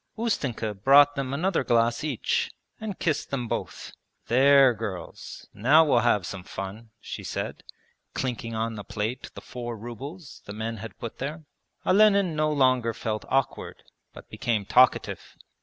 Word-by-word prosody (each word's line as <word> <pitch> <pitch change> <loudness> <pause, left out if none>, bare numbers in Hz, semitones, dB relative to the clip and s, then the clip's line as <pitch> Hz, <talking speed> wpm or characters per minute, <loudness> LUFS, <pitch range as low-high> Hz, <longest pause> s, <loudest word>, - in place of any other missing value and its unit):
Ustenka 135 - -1
brought 140 +8 +6
them 135 -2 -3
another 165 +3 0
glass 115 +2 +2
each, 145 -7 -1 0.3
and 215 -3 -5
kissed 155 -3 -1
them 125 -4 -3
both. - - -5 0.3
'There 135 +1 +6
girls, 105 -5 -7
now 145 +9 +5
we'll 140 -5 +4
have 105 -5 +2
some 95 0 -6
fun,' 95 +5 -7
she - - -7
said, - - -4 0.5
clinking 115 -3 -3
on 115 +1 -1
the 105 -2 -7
plate 105 +5 -4
the - - -8
four 120 -2 -6
rubles 135 - -9
the 100 - -7
men 110 +1 -4
had 110 -2 -9
put 115 - -7
there. 150 +4 -5 0.4
Olenin 200 -4 +4
no 155 0 +1
longer 130 -5 +2
felt 110 -2 -3
awkward, 135 -1 -1 0.3
but - - -13
became 110 -4 -2
talkative. 125 +5 +2
125 Hz, 150 wpm, -26 LUFS, 110-145 Hz, 0.5 s, brought